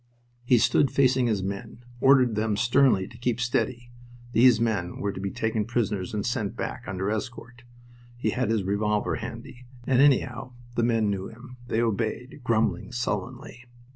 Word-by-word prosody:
He 120 Hz, 0 st, +4 dB
stood 135 Hz, +4 st, +3 dB
facing 130 Hz, -2 st, +3 dB
his 105 Hz, -4 st, 0 dB
own -, -, -2 dB
men, 100 Hz, +4 st, -8 dB
ordered 130 Hz, -2 st, +5 dB
them 105 Hz, -1 st, 0 dB
sternly 120 Hz, -3 st, +3 dB
to -, -, -14 dB
keep 120 Hz, -1 st, -1 dB
steady. 120 Hz, 0 st, -1 dB, 0.4 s
These 120 Hz, -2 st, +6 dB
men 110 Hz, -7 st, -1 dB
were 100 Hz, -, -1 dB
to 95 Hz, -, -7 dB
be 100 Hz, 0 st, -3 dB
taken 110 Hz, +1 st, -1 dB
prisoners 105 Hz, -5 st, -2 dB
and 105 Hz, -1 st, -3 dB
sent 115 Hz, -3 st, -2 dB
back 120 Hz, 0 st, -5 dB
under 95 Hz, +1 st, -2 dB
escort. 120 Hz, +2 st, -6 dB, 0.6 s
He 120 Hz, -, -1 dB
had 125 Hz, -2 st, -1 dB
his 110 Hz, -3 st, +1 dB
revolver 105 Hz, +2 st, 0 dB
handy, 120 Hz, +2 st, -9 dB, 0.2 s
and, 130 Hz, 0 st, +3 dB
anyhow, 130 Hz, -2 st, +2 dB, 0.2 s
the 120 Hz, -, 0 dB
men 115 Hz, -3 st, +2 dB
knew 95 Hz, -1 st, -3 dB
him. 125 Hz, +2 st, -13 dB
They 115 Hz, 0 st, 0 dB
obeyed, 115 Hz, +5 st, -3 dB
grumbling 110 Hz, -5 st, 0 dB
sullenly. 125 Hz, +1 st, -4 dB
115 Hz, 170 wpm, -26 LUFS, 105-125 Hz, 0.6 s, These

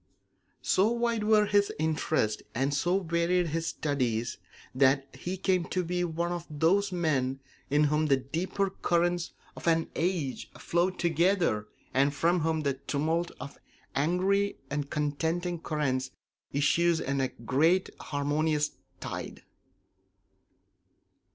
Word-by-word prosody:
So 190 Hz, +3 st, +3 dB
wide 235 Hz, -2 st, 0 dB
were 215 Hz, -1 st, +5 dB
his 205 Hz, 0 st, +2 dB
interests 155 Hz, -8 st, 0 dB
and 135 Hz, +4 st, +1 dB
so 175 Hz, +6 st, +1 dB
varied 170 Hz, +1 st, +1 dB
his 165 Hz, +2 st, -2 dB
studies 125 Hz, -6 st, -1 dB, 0.3 s
that 135 Hz, +1 st, +3 dB
he 185 Hz, +2 st, -4 dB
came 185 Hz, -1 st, +1 dB
to 185 Hz, -, -1 dB
be 180 Hz, +1 st, -1 dB
one 170 Hz, 0 st, -1 dB
of 175 Hz, -1 st, -4 dB
those 175 Hz, +7 st, +2 dB
men 140 Hz, -7 st, 0 dB, 0.3 s
in 145 Hz, +2 st, +3 dB
whom 150 Hz, +1 st, +2 dB
the 135 Hz, -2 st, +4 dB
deeper 175 Hz, +9 st, -2 dB
currents 175 Hz, -1 st, 0 dB, 0.2 s
of -, -, -8 dB
an 165 Hz, -1 st, +2 dB
age 165 Hz, -6 st, -1 dB
flow 175 Hz, +2 st, +1 dB
together 170 Hz, -, +1 dB, 0.3 s
and 140 Hz, +3 st, +3 dB
from 170 Hz, +4 st, +2 dB
whom 160 Hz, 0 st, 0 dB
the 140 Hz, -2 st, +1 dB
tumult 155 Hz, +5 st, -1 dB
of 140 Hz, -, -8 dB, 0.4 s
angry 185 Hz, +7 st, +1 dB
and 140 Hz, 0 st, -2 dB
contending 160 Hz, +4 st, -1 dB
currents 130 Hz, -5 st, -1 dB, 0.4 s
issues 165 Hz, +4 st, +3 dB
in 135 Hz, -2 st, -1 dB
a 130 Hz, -, +2 dB
great 155 Hz, +11 st, +1 dB
harmonious 150 Hz, +1 st, 0 dB, 0.3 s
tide. -, -, -6 dB
160 Hz, 125 wpm, -29 LUFS, 140-175 Hz, 0.4 s, were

